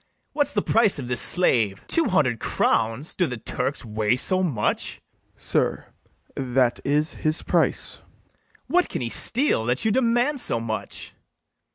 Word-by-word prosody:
What's 290 -1 0
the - - 0
price 220 -5 +3
of 130 -4 -5
this 125 -1 +1
slave? 115 - +3
two 330 - +2
hundred 145 - +1
crowns! 115 +7 0
do 180 - 0
the 125 - -5
Turks 125 +4 -3
weigh 110 +1 0
so 185 +8 0
much? 135 - -1 0.4
FIRST - - -38
OFFICER. - - -21
Sir, - - -1 0.5
that's 125 -2 0 0.3
his 155 +1 -2
price. - - 0
BARABAS. - - -33 0.3
What, 360 +1 +1
can - - -4
he 115 - -3
steal, 245 - +2
that 125 - 0
you 220 - +3
demand 245 +4 +1
so 115 - +1
much? 110 -3 -5
130 Hz, 160 wpm, -23 LUFS, -, 0.5 s, price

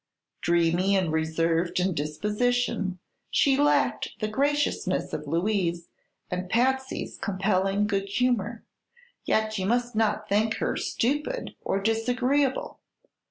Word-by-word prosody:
Dreamy 170 +3 +2
and 185 -4 +1
reserved 165 +2 0
in 185 +1 +1
disposition, 205 +5 -1 0.3
she 275 -2 +3
lacked 290 +2 +2
the 215 - -1
graciousness 285 +6 0
of - - -4
Louise 170 -1 0 0.4
and 180 0 -3
Patsy's 265 +4 0
compelling 195 0 +1
good 200 -1 -1
humor; 235 -1 0 0.6
yet 220 -1 +1
you 190 - -1
must 240 +1 0
not 215 -1 +1
think 220 +2 +2
her - - -1
stupid 295 - -1
or 195 - 0
disagreeable. 250 +6 0
210 Hz, 115 wpm, -26 LUFS, 185-245 Hz, 0.6 s, she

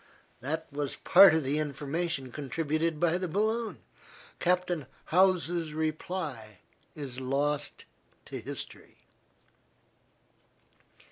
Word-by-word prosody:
That 160 +5 -3
was 145 -1 -2
part 190 -3 +8
of 160 - +1
the 140 +3 0
information 145 -1 -2
contributed 155 +3 -1
by 175 +1 +2
the 185 - -2
balloon. 220 +6 -1 0.6
Captain 180 -5 +1 0.2
Howse's 175 -3 +3
reply 155 - -3 0.4
is 135 -4 -6
lost 140 +3 -1 0.4
to - - -6
history. - - -8
155 Hz, 90 wpm, -30 LUFS, 145-175 Hz, 0.6 s, part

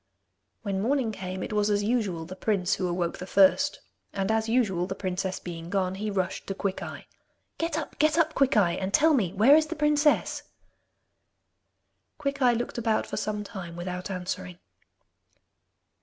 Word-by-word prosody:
When 195 -3 -1
morning 250 0 +1
came, 185 -2 -5
it - - -5
was 210 0 +2
as 205 0 +1
usual 205 -8 -1
the 185 +3 -8
prince 195 -2 0
who 185 - -1
awoke 175 -1 -2
the 185 - -6
first, 200 +11 +4 0.3
and 195 +1 -1
as 220 0 0
usual, 200 -7 +1
the 190 - -4
princess 185 -1 -3
being 170 -1 -7
gone, 190 -1 0
he 210 +3 -3
rushed 190 -3 -2
to 195 - -3
Quickeye. 195 -1 -4 0.6
'Get 330 -1 -1
up, 315 - -6
get 310 +1 +3
up, 320 -2 +3
Quickeye, 215 -11 +3
and 190 +1 +1
tell 320 +1 +5
me 205 - +1
where 220 +9 +6
is 310 0 +3
the - - -4
princess?' 295 0 +2 1.8
Quickeye 275 -4 +2
looked 240 0 -3
about 225 -2 +1
for - - -5
some 210 -1 -2
time 190 -5 -8
without 180 +1 -5
answering. 180 - -4
200 Hz, 165 wpm, -27 LUFS, 185-250 Hz, 1.8 s, where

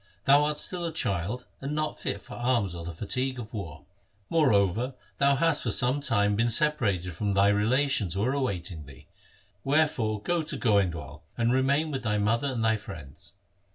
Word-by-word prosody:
Thou 145 +2 +6
art 150 0 -1
still 180 +3 -1
a 165 - -2
child 110 - -2 0.2
and 140 +2 -3
not 155 0 -2
fit 100 - -3
for - - -11
arms 120 -6 0
or 85 -1 -7
the 85 - -5
fatigue 130 +9 -3
of 115 -1 -8
war. 90 -9 -7 0.5
Moreover, 120 - +2 0.2
thou 140 0 +4
hast 160 +1 +2
for - - -2
some 130 +3 +3
time 105 -7 +2
been 115 +3 +2
separated 110 - +1
from 100 +3 -2
thy 100 +1 +5
relations 105 - +1
who 100 - 0
are 130 +4 +1
awaiting 90 - -3
thee. 70 -2 -14 0.6
Wherefore 135 -7 +1
go 175 +10 0
to 155 -2 -3
Goindwal, 85 - 0 0.2
and 120 +1 +2
remain 140 +4 +2
with 135 -2 -3
thy 105 -3 0
mother 115 +6 +1
and 115 -3 -1
thy 110 0 +3
friends.' 80 -10 -11
115 Hz, 185 wpm, -27 LUFS, 100-140 Hz, 0.6 s, Thou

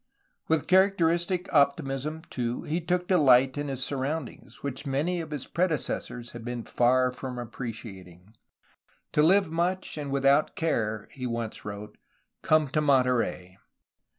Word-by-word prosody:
'^ - - -53 0.4
With 160 -2 +1
charac 190 +1 +4
teristic 175 +2 +1
optimism, 140 +1 +1
too, 120 -2 -3
he 165 +4 -2
took 180 +2 -1
delight 135 -7 +5
in 145 0 -3
his 135 -2 -2
surroundings, 135 -3 -4
which 140 0 -4
many 160 +6 0
of 160 - -8
his 145 -4 -4
predecessors 150 -8 -2
had 120 -1 -9
been 120 0 -4
far 125 +2 +2
from 125 0 -6
appre 120 0 -5
ciating. 95 -3 -11 0.8
''To 150 - +4
live 190 +1 +4
much, 175 0 -1
and 145 -1 -4
without 140 +2 +2
care,'' 110 -10 -1
he 130 -2 -5
once 115 -2 -4
wrote, 105 +1 -8 0.4
*'come 155 -1 +3
to 150 +3 0
Monterey.'' 125 -10 +1
135 Hz, 150 wpm, -27 LUFS, 120-160 Hz, 0.8 s, delight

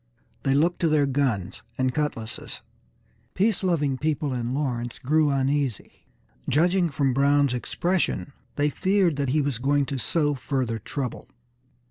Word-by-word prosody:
They 135 -1 +1
looked 170 +5 +2
to 170 - +2
their 150 -2 +3
guns 130 -9 -1 0.2
and 130 -1 +1
cutlasses. 115 -7 -4 0.7
Peace 210 +4 +2
loving 150 -7 +1
people 150 -2 -1
in 120 -1 -2
Lawrence 125 -4 -2
grew 150 +3 +2
uneasy. 135 -3 -1 0.4
Judging 175 +4 +3
from 140 -2 0
Brown's 140 0 +3
expression, 170 +3 -1 0.2
they 145 0 +1
feared 190 -3 +2
that 140 -2 0
he 150 +3 +2
was 140 -5 -2
going 140 +2 +2
to 135 0 -4
sow 145 +3 +1
further 130 -4 -2
trouble. 130 +4 -5
140 Hz, 140 wpm, -25 LUFS, 130-155 Hz, 0.7 s, their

